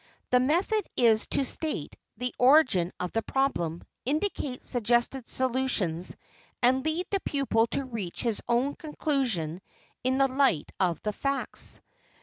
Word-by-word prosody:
The 250 - +6
method 350 +11 +2
is 225 -3 +4
to 275 - +2
state 295 - -3 0.2
the 250 +2 -2
origin 250 - +5
of 180 -1 -3
the 225 - 0
problem, 175 -12 -1 0.2
indicate 290 -3 -2
suggested 240 +1 0
solutions, 245 -10 +1 0.5
and 260 +2 +4
lead 315 +4 -1
the 395 - +1
pupil 270 -9 +1
to 275 - -2
reach 220 -9 -4
his 230 -4 0
own 250 +4 +2
conclusion 250 - -2 0.4
in 260 +1 +1
the 270 0 +4
light 265 - +1
of 175 -3 +1
the 210 - -1
facts. 275 +5 -2
255 Hz, 135 wpm, -28 LUFS, 215-275 Hz, 0.5 s, The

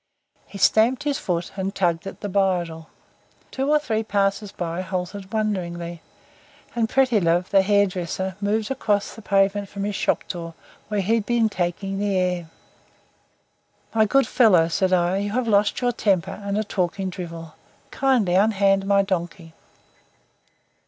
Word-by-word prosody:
He 200 - -10
stamped 230 +7 +3
his 295 0 -1
foot 175 - -2
and 195 +1 -3
tugged 175 -2 0
at 195 - -9
the - - -3
bridle. 180 -5 -1 0.6
Two 270 +2 -2
or 300 - +5
three 225 -7 -1
passers 200 -1 0
by 170 -1 -4
halted 185 +1 -5
wonderingly 175 -6 -3 0.7
and 230 -2 0
Prettilove, 195 -10 +2
the 195 - +6
hairdresser, 190 -2 0
moved 210 +3 0
across 210 -6 0
the 225 - -11
pavement 200 0 +1
from 200 0 -5
his 205 0 -2
shop - - 0
door 165 -2 -6 0.3
where 210 -1 -1
he 205 +4 +1
had 225 -3 0
been 235 -2 +2
taking 195 +1 -3
the 200 -2 0
air. 180 -2 -1 1.4
"My 220 -1 +4
good 275 +5 +3
fellow," 185 -10 +4
said 190 +2 +1
I, 180 +1 +2
"you 200 +1 -2
have 255 0 0
lost 205 +1 +2
your 245 0 +2
temper 195 -7 0
and 200 0 -2
are 215 - +1
talking 190 -1 -2
drivel. 165 -3 -8 0.4
Kindly 255 -9 +2
unhand 195 -1 +3
my 200 0 +4
donkey." 175 -3 -4
195 Hz, 150 wpm, -23 LUFS, 180-215 Hz, 1.4 s, the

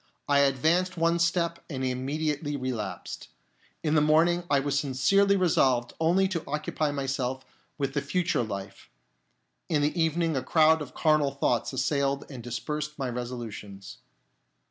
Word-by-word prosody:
I 140 -1 +4
.advanced 160 +7 +2
one 165 +1 +2
step 170 0 0
and 130 -4 -3
immediately 145 +3 -2
relapsed. 125 -6 -5 0.6
In 155 -2 +1
the 155 - +4
morning 165 +3 +3
I 140 - +4
was 140 0 0
sincerely 195 +10 +3
re 185 -1 +2
solved 125 -6 +2
only 175 +4 +3
to 170 -4 -3
occupy 150 +1 -1
myself 135 -2 -2 0.3
with 140 -2 -2
the 145 - 0
future 140 +1 0
life; 100 -3 -6 0.8
in 150 -4 +2
the 155 +3 0
evening 165 0 +1
a 130 - 0
crowd 160 +1 +4
of 145 - -8
carnal 155 -3 +3
thoughts 135 -4 0
assailed 140 +1 0
and 130 -3 -7
dispersed 150 +6 -4
my 135 -3 -2
resolutions. 110 -5 -7
145 Hz, 145 wpm, -27 LUFS, 130-160 Hz, 0.8 s, I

